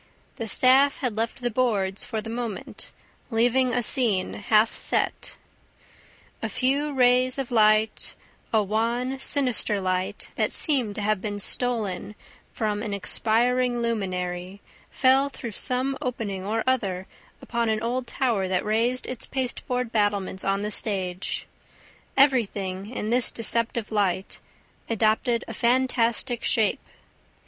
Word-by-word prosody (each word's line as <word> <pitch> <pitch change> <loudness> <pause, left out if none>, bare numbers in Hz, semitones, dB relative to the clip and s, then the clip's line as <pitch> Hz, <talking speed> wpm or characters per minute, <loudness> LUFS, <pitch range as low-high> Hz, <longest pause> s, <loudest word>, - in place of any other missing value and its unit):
The 225 - -4
staff 265 +5 +4
had 250 -6 -3
left 225 +2 -3
the 240 - 0
boards 205 -5 +1
for 220 -2 -4
the 225 - -8
moment, 230 -4 -6 0.4
leaving 245 +2 +2
a 245 0 0
scene 220 -7 +1
half 215 +2 +2
set. - - 0 1.0
A - - -2
few 280 +3 0
rays 255 -1 +3
of 270 -3 -4
light, 215 -1 +2 0.4
a 220 -2 +3
wan, 235 +6 -1
sinister 250 -7 +2
light, 185 -1 -3
that - - 0
seemed 255 -10 +4
to 210 - -4
have 210 -2 0
been 205 0 -4
stolen 210 -2 -2 0.4
from 210 -2 -2
an 210 -2 -3
expiring 240 +5 +1
luminary, 185 -5 -3 0.3
fell 270 +1 +3
through 235 -4 -7
some 255 +5 +1
opening 210 -6 -4
or 220 +3 -1
other 195 -8 -1 0.3
upon 235 -1 -2
an 220 0 -1
old 245 +2 -2
tower 230 -9 0
that 185 +1 -1
raised 230 +4 0
its 255 -2 -5
pasteboard 250 -2 -2
battlements 205 -3 -1
on 195 +1 0
the 210 - -3
stage; 190 -4 -3 0.7
everything, 205 -8 +1
in 225 -3 -4
this 245 0 +4
deceptive 230 0 +1
light, 195 -3 -1 0.5
adopted 230 +2 +1
a - - -6
fantastic 240 -1 +1
shape. 220 -3 +2
225 Hz, 130 wpm, -25 LUFS, 205-250 Hz, 1.0 s, staff